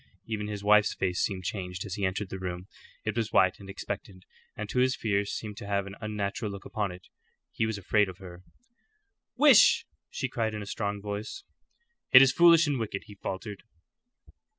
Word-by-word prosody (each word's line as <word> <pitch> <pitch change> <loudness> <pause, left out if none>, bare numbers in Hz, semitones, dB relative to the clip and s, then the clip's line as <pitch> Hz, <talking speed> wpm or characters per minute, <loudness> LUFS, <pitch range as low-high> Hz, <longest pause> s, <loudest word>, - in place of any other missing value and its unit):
Even 105 -2 -3
his 105 -1 -5
wife's 105 0 +4
face 90 -1 -1
seemed 95 -3 -2
changed 90 -1 -4
as 100 - -6
he 100 - -4
entered 95 +1 -4
the 95 - -6
room. 90 -1 -5 0.4
It - - -1
was - - -1
white - - +3
and - - -12
expectant, - - -7 0.3
and - - -4
to 125 - -1
his 130 +1 +3
fears 100 -2 -1
seemed 105 -2 -6
to 100 - -8
have 100 -1 0
an 100 - -8
unnatural 105 0 -3
look 100 0 -9
upon 105 -3 -2
it. 90 +1 -12 0.4
He 110 - -1
was 110 -2 -3
afraid 100 +1 +2
of 90 - -9
her. 90 -2 -11 1.0
"Wish!" 285 -6 +6 0.2
she - - -3
cried, 110 -2 -2
in 105 - -5
a - - -8
strong 100 0 -3
voice. 105 - -5 0.7
"It 130 +1 +10
is 135 - +4
foolish 170 -1 +6
and 145 -4 -1
wicked," 105 -3 -4
he 105 - -12
faltered. 100 +1 -6
105 Hz, 195 wpm, -28 LUFS, 95-110 Hz, 1.0 s, It